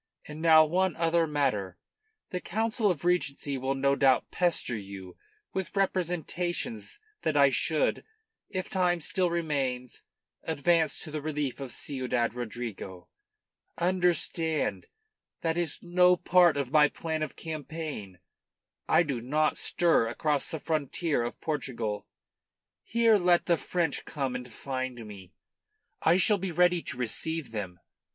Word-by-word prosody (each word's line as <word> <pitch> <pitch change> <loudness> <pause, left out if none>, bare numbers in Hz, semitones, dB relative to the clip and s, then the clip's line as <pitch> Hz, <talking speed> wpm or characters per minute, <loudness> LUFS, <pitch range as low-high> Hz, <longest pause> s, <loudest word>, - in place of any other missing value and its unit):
And 150 +1 -8
now 160 -1 +7
one 180 +2 +1
other 165 0 +2
matter: 105 - -1 0.5
the 180 -2 -3
Council 220 +1 0
of 175 -2 -2
Regency 145 -5 0
will 135 +1 -1
no 140 +1 +2
doubt 135 -2 +3
pester 175 -8 0
you 95 -3 -8 0.4
with 190 +1 -4
representations 175 - -2 0.2
that 155 -2 0
I 140 -1 +6
should 155 +3 +1 0.5
if 185 -2 -3
time 180 -2 +1
still 180 +3 +1
remains 140 -7 -2 0.4
advance 160 0 +1
to 155 - -7
the 155 0 -3
relief 150 -3 -3
of 135 -3 -6
Ciudad 125 -4 -2
Rodrigo. 115 -6 -6 0.7
Understand, 175 -2 0 0.5
that 165 -1 0
is 170 -3 0
no 180 0 +4
part 175 -3 +4
of 135 -3 -2
my 150 -1 +6
plan 160 0 -4
of 155 - -3
campaign. 155 - -6 0.7
I 175 - +5
do 140 -7 -3
not 150 +5 +1
stir 165 -9 +2
across 145 +4 0
the 160 - -4
frontier 155 -1 -1
of 120 - -4
Portugal. 120 -9 -3 0.7
Here 230 -1 +3
let 175 -1 +3
the 170 - +4
French 170 0 -1
come 135 -4 -3
and 125 -1 -6
find 130 -1 -5
me, 95 -2 -12 0.7
and 160 - +5
I - - +4
shall 200 +2 +3
be 190 -1 -3
ready 175 +1 +3
to 130 - -7
receive 155 +5 -2
them. 95 -5 -5
155 Hz, 140 wpm, -29 LUFS, 130-175 Hz, 0.7 s, now